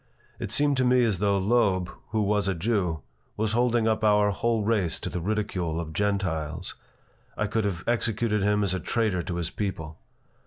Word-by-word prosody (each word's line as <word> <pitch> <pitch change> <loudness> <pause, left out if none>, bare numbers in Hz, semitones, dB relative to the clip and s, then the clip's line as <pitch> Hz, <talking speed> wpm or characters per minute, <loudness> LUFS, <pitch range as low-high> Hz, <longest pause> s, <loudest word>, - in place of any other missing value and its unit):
It - - -4
seemed 145 -1 +2
to 130 - +2
me 125 0 +4
as 105 -6 +1
though 100 0 +2
Loeb, 95 -3 +2 0.2
who 110 -2 0
was 105 -1 +1
a 95 - 0
Jew, 90 -4 -1 0.4
was 110 0 0
holding 120 -1 +2
up 110 -1 +1
our 105 -1 +4
whole 115 +1 0
race 100 -7 +1
to - - -5
the 90 - -3
ridicule 90 -4 -2
of 80 -2 -5
Gentiles. 85 -5 -2 0.6
I 105 - 0
could 110 +1 -1
have 90 -3 -2
executed 115 -2 +1
him 105 +1 +2
as 95 -2 0
a 95 - -1
traitor 110 -6 0
to 85 +1 -4
his 85 -2 -3
people. 80 -6 -4
105 Hz, 190 wpm, -26 LUFS, 90-110 Hz, 0.6 s, me